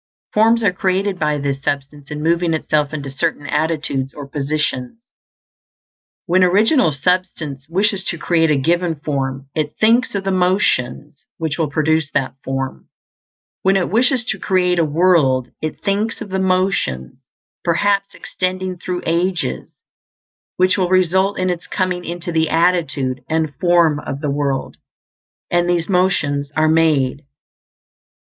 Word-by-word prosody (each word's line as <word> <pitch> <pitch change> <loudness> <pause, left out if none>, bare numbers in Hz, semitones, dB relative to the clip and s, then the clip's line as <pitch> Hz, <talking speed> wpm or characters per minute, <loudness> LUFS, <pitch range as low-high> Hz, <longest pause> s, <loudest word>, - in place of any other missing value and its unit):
Forms 225 +2 +4
are 200 -4 +3
created 190 +1 -1
by 150 -1 +1
this 140 -1 -2
substance 140 0 -4
in 150 0 -5
moving 170 0 +2
itself 150 -2 0
into 140 -3 -5
certain 140 +1 -2
attitudes 150 -4 -1
or 145 -2 -8
positions. 140 - -2 1.3
When 185 +2 +3
Original 205 - +4
Substance 150 -3 -1
wishes 195 +2 +1
to 170 - -2
create 165 0 +2
a 150 - +3
given 170 +4 +1
form, 135 -2 -3
it 150 -2 -3
thinks 225 +1 +3
of 195 - -1
the 195 - -1
motions 180 -7 0
which 160 -1 -3
will 160 -3 +1
produce 155 0 +1
that 135 -2 0
form. 135 0 -4 0.7
When 195 +1 +3
it 180 - -1
wishes 245 +2 +2
to 195 - -2
create 180 -2 +1
a - - +4
world, 150 -6 +2
it 155 -1 -5
thinks 210 +3 -1
of - - -7
the 190 0 -1
motions, 185 - 0 0.4
perhaps 200 +3 +1
extending 185 0 -3
through 180 0 -4
ages, 170 - -1 0.9
which 185 +1 +3
will 180 -1 +1
result 185 +2 +2
in 185 0 0
its 175 -1 -5
coming 185 -2 -1
into 175 +1 -5
the 160 -1 +1
attitude 160 -7 +1
and 160 -2 0
form 170 -4 +3
of 140 -2 -5
the 150 -3 -1
world; 140 -2 -2 0.7
and 175 0 +2
these 170 -2 +1
motions 150 -7 +1
are 155 0 +3
made. 155 -4 +2
165 Hz, 145 wpm, -19 LUFS, 145-185 Hz, 1.3 s, Forms